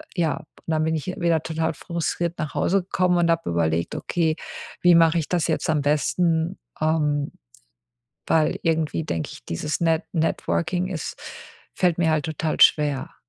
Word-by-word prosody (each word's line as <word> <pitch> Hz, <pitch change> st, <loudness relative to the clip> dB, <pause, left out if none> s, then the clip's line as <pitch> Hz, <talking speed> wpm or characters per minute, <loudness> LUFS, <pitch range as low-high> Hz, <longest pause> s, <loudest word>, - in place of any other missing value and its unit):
ja, 165 Hz, -4 st, +1 dB
und 155 Hz, -, -11 dB, 0.2 s
dann 155 Hz, -1 st, +1 dB
bin 160 Hz, 0 st, 0 dB
ich 155 Hz, -, -4 dB
wieder 170 Hz, -3 st, 0 dB
total 160 Hz, 0 st, -1 dB
frustriert 170 Hz, 0 st, -3 dB
nach 155 Hz, -2 st, -3 dB
Hause 195 Hz, 0 st, +2 dB
gekommen 180 Hz, -1 st, +1 dB
und 170 Hz, -1 st, +2 dB
habe 165 Hz, -, 0 dB
überlegt: 85 Hz, 0 st, 0 dB
„Okay, 160 Hz, -2 st, 0 dB, 0.5 s
wie 175 Hz, -1 st, +6 dB
mache 165 Hz, 0 st, +5 dB
ich 155 Hz, -, -3 dB
das 175 Hz, -2 st, +1 dB
jetzt 160 Hz, 0 st, -1 dB
am 150 Hz, -2 st, +2 dB
besten?“ 160 Hz, +4 st, +1 dB, 0.2 s
Ähm, 150 Hz, -2 st, +1 dB, 1.0 s
weil 155 Hz, -1 st, +2 dB
irgendwie, 160 Hz, -1 st, 0 dB
denke 80 Hz, -, -3 dB
ich, -, -, -14 dB
dieses 150 Hz, -, -3 dB
Net 165 Hz, 0 st, +2 dB
Networking 175 Hz, +2 st, 0 dB
ist 170 Hz, -6 st, -5 dB, 0.6 s
fällt 180 Hz, -2 st, +2 dB
mir 165 Hz, -2 st, +2 dB
halt 155 Hz, +1 st, +1 dB
total 160 Hz, 0 st, -2 dB
schwer. 145 Hz, -3 st, +4 dB
160 Hz, 165 wpm, -24 LUFS, 155-170 Hz, 1.0 s, wie